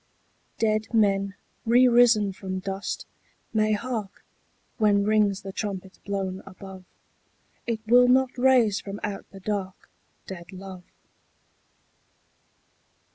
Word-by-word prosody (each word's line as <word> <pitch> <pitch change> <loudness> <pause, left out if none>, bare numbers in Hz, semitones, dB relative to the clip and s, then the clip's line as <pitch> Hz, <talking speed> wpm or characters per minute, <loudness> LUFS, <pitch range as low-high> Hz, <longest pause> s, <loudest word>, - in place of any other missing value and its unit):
Dead 215 -1 0
men, 200 -2 +2 0.3
re 245 +3 +5
risen 235 -5 +5
from 190 -1 -5
dust, 195 - -4 0.5
may 215 -1 +2
hark 215 -2 -4 0.5
When 205 -2 +4
rings 210 -2 +2
the 195 -1 -7
trumpet 190 -3 -5
blown 195 -2 -3
above: 190 -1 -11 0.8
It 225 -2 -1
will 245 +2 +6
not 255 0 +3
raise 245 -5 +4
from 200 0 -7
out 205 -1 -5
the 195 - -12
dark 195 -2 -4 0.3
Dead 175 -2 -9
love. 185 -1 -10
205 Hz, 110 wpm, -26 LUFS, 195-225 Hz, 0.8 s, will